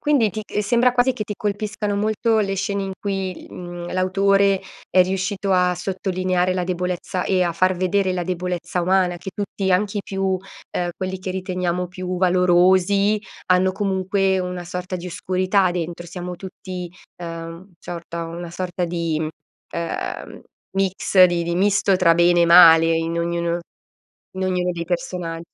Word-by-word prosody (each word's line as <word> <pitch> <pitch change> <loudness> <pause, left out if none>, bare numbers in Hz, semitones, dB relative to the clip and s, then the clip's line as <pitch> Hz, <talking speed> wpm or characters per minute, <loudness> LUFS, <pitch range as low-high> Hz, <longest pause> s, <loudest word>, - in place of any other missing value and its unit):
Quindi 275 -8 +3
ti 215 +1 -5
c 210 - -2
sembra 240 +3 +3
quasi 250 +1 +3
che 215 - -4
ti 210 - -5
colpiscano 205 0 -2
molto 220 +2 +1
le 195 -2 0
scene 195 +1 -2
in 195 - -4
cui, 195 -3 -4
mhmm, 175 -1 -7
l'autore 195 +1 +3 0.3
è 185 - +6
riuscito 195 +2 -2
a 180 -1 +3
sottolineare 185 -1 -1
la 180 - -1
debolezza 180 0 -2
e 185 -1 +2
a 175 - 0
far 185 +2 +2
vedere 185 +1 +1
la 180 -1 -2
debolezza 180 0 -2
umana 180 0 +2
che 190 - -7
tutti, 195 -2 -2
anche 205 +3 +1
i - - 0
più 195 0 -4
uhm, 185 -1 -5
quelli 185 0 -3
che 185 0 -5
riteniamo 180 -1 -2
più 180 0 -5
valorosi, 185 +3 +3 0.3
hanno 185 +1 +3
comunque 190 -1 0
una 180 -1 -4
sorta 180 +1 -5
di 180 +1 -7
oscurità 185 +2 +1
dentro. 175 0 -4
Siamo 180 +1 -6
tutti, 185 -1 -7 0.3
uhm, 170 +2 -8
ciorta 170 -1 -6
una 170 +1 -7
sorta 180 0 -3
di, 170 -2 -1
mhmm, 155 - -1 0.4
ehm, 170 -1 -5 0.3
mix 190 -1 +4
di 175 -1 +2
di 170 0 -2
misto 195 0 +3
tra 170 -2 +4
bene 175 0 +4
e - - +4
male, 165 -1 +8
in 165 +1 -1
ognuno 170 0 -1 0.8
in 190 - -2
ognuno 180 -1 0
dei 170 -1 -5
persona 175 -1 -3
185 Hz, 160 wpm, -22 LUFS, 175-195 Hz, 0.8 s, male